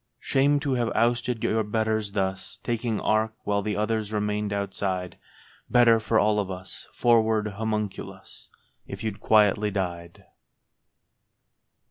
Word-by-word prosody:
Shame 140 +2 +2
to 140 -3 -1
have 120 -2 0
ousted 120 0 +1
your 110 +1 +1
betters 110 -1 -1
thus, 95 -2 -3
Taking 115 -2 -1
ark 110 +1 +1
while 100 0 0
the 105 0 -2
others 105 0 -1
remained 105 -1 -1
outside! 95 -2 -3 0.5
Better 120 -2 +5
for 110 +1 0
all 105 0 +3
of 100 -2 -2
us, 95 0 -8
froward 110 -2 +2
Homunculus, 105 0 -5 0.4
If 100 +3 -7
you'd 110 -3 -3
quietly 105 -1 +3
died 90 -1 -4
105 Hz, 125 wpm, -26 LUFS, 100-110 Hz, 0.5 s, Better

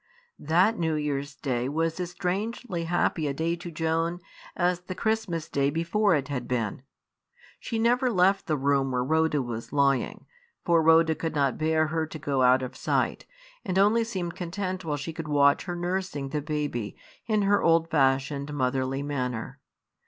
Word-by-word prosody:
That 180 +9 +2
New 160 -2 0
Year's 145 -1 -2
Day 125 -3 -2
was 165 +3 -1
as 180 -1 -2
strangely 185 +1 -3
happy 165 -2 0
a 140 - -2
day 165 +3 0
to 175 0 -8
Joan 165 +1 -1 0.4
as 180 0 +1
the 180 +1 -7
Christmas 210 -6 -1
Day 140 0 +1
before 170 +5 +2
it 140 -3 -1
had 125 -4 -4
been. 120 -3 -2 0.8
She 230 - -4
never 245 +3 +2
left 195 -2 +2
the 155 -3 +1
room 140 0 +1
where 125 -1 0
Rhoda 160 0 +1
was 115 -2 -6
lying; 140 -2 +1 0.4
for 170 -2 +4
Rhoda 160 0 +5
could 160 0 -4
not 140 -3 +1
bear 155 0 +2
her 160 0 -1
to 155 - -8
go 140 -3 -1
out 130 +1 +5
of 125 - -6
sight, - - -1 0.4
and 185 - -2
only 210 +4 +4
seemed 185 -7 -4
content 185 +1 -4
while 150 -3 -2
she 155 +3 -5
could 160 -1 -6
watch 140 -1 +3
her 175 -1 -4
nursing 175 -5 -3
the 150 +1 -2
baby, 145 -7 -3 0.3
in 215 -2 +2
her 200 +1 +3
old 165 0 +3
fashioned, 140 0 +1
motherly 130 0 -1
manner. 130 -2 -3
160 Hz, 175 wpm, -27 LUFS, 140-180 Hz, 0.8 s, Rhoda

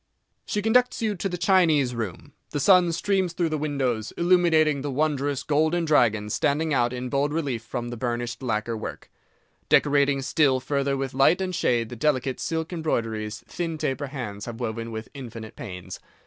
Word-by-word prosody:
She 210 -2 -1
conducts 245 +2 +2
you 215 -2 +1
to 195 0 -3
the 180 - -3
Chinese 170 -8 +3
Room; 110 -7 -5 0.2
the 145 - -3
sun 180 +2 +5
streams 185 +1 0
through 170 -1 0
the 155 - -1
windows, 130 -7 -1
illuminating 170 -5 +3
the 145 - -3
wondrous 145 -1 0
golden 160 +3 +1
dragons 110 -8 +2
standing 155 +2 +1
out 120 -2 +2
in 125 0 -4
bold 140 +2 0
relief 145 -7 -2
from 120 0 -5
the 120 - -6
burnished 120 +1 -3
lacquer 115 -2 -1
work, 110 - -7 0.6
decorating 140 -1 +3
still 135 -2 +3
further 140 +1 -1
with 135 -1 -3
light 135 +7 +4
and 185 -1 -2
shade 120 -9 +1
the 120 - -7
delicate 130 0 0
silk 160 +1 -3
embroideries 115 -9 -2
thin 165 -2 -3
taper 140 0 -2
hands 110 -7 -6
have 120 -1 -7
woven 115 -1 -3
with 110 +1 -6
infinite 115 -5 -8
pains. 90 -6 -8
140 Hz, 175 wpm, -25 LUFS, 120-160 Hz, 0.6 s, sun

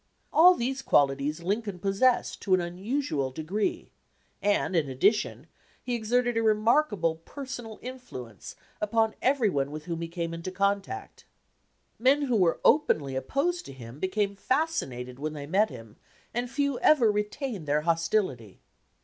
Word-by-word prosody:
All 360 +3 +8
these 265 +1 -2
qualities 145 - +1
Lincoln 205 +1 -2
possessed 195 +7 +1
to 190 -3 +3
an - - 0
unusual 175 - -2
degree, 160 +10 -3 0.5
and, 200 -2 +1
in 155 -5 +1
addition, 195 - +1 0.4
he 250 - -3
exerted 240 +1 +1
a 230 - +2
remarkable 215 - +2
personal 240 - -8
influence 180 - -9 0.3
upon 220 +1 +1
every 260 -3 +3
one 140 -2 0
with 155 +1 -7
whom 170 -1 -4
he 165 - -3
came 170 0 -4
into 165 +2 -5
contact. 200 - -2 0.7
Men 270 +5 +4
who 250 -4 +1
were 180 -5 +3
openly 150 - +3
op 130 0 -4
posed 350 +6 0
to - - -9
him 125 +1 -11
became 200 +2 -1
fascinated 135 - -2
when 155 +1 -3
they 145 -2 -6
met 195 +8 +2
him, 115 -5 -11 0.4
and 240 +1 -2
few 280 -1 -1
ever 245 -8 +5
retained 210 - -3
their 150 +1 +2
hostility. 165 - -1
200 Hz, 150 wpm, -28 LUFS, 155-245 Hz, 0.7 s, All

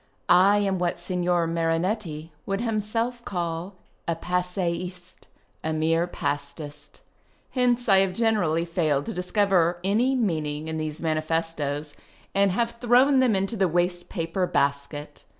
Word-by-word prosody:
I 190 +3 +6
am 195 -2 +1
what 175 -1 0
Signor 175 -1 0
Marinetti 165 0 -1 0.2
would 195 0 -1
himself 230 +2 -1
call 175 0 -3 0.3
a 170 - +1
Passeiste, 180 0 -3 0.4
a 160 - -1
mere 165 +2 +1
Pastist. 145 -1 -5 0.5
Hence 245 -1 +1
I 195 -2 +6
have 190 -1 +2
generally 180 -7 +1
failed 155 -5 0
to - - -4
discover 180 -2 +2
any 230 +7 +2
meaning 155 - -1
in 160 0 -3
these 155 +1 -4
manifestos, 155 -2 -1 0.4
and 200 -1 +3
have 235 +4 -1
thrown 255 +3 +5
them 250 -5 +4
into 195 +4 -1
the 195 -3 +2
waste 175 +1 0
paper 170 +2 -1
basket. 140 +1 -2
175 Hz, 130 wpm, -25 LUFS, 160-200 Hz, 0.5 s, I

